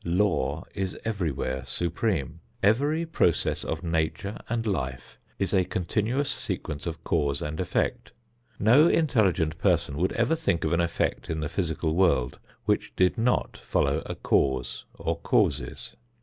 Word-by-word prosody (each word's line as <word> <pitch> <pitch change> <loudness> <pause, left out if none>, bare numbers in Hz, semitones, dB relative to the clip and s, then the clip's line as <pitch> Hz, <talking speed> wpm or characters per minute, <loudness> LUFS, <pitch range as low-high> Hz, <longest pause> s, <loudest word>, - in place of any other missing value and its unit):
Law 85 -5 +1
is 95 -2 -3
everywhere 80 - -2
supreme. 85 - -1 0.2
Every 145 +11 +3
process 90 - +1
of 80 +2 -3
nature 85 +5 -1
and 115 0 -1
life 65 - -3 0.2
is 95 - -1
a 95 -2 +4
continuous 110 - -1
sequence 75 - -4
of 80 0 -5
cause 70 -4 +1
and 75 +1 -4
effect. - - -1 0.5
No 125 +10 +6
intelligent 95 - +2
person 70 - +1
would 90 +4 +1
ever 115 +7 +2
think 155 - 0
of 80 +1 0
an 85 - +3
effect 85 -1 -1
in 80 -1 -2
the 75 -1 -2
physical 80 -2 -1
world 80 -9 +2 0.3
which - - 0
did 90 0 +3
not 120 +1 +1
follow - - 0
a - - -4
cause 65 -3 0
or - - -2
causes. - - 0
85 Hz, 145 wpm, -27 LUFS, 80-110 Hz, 0.5 s, No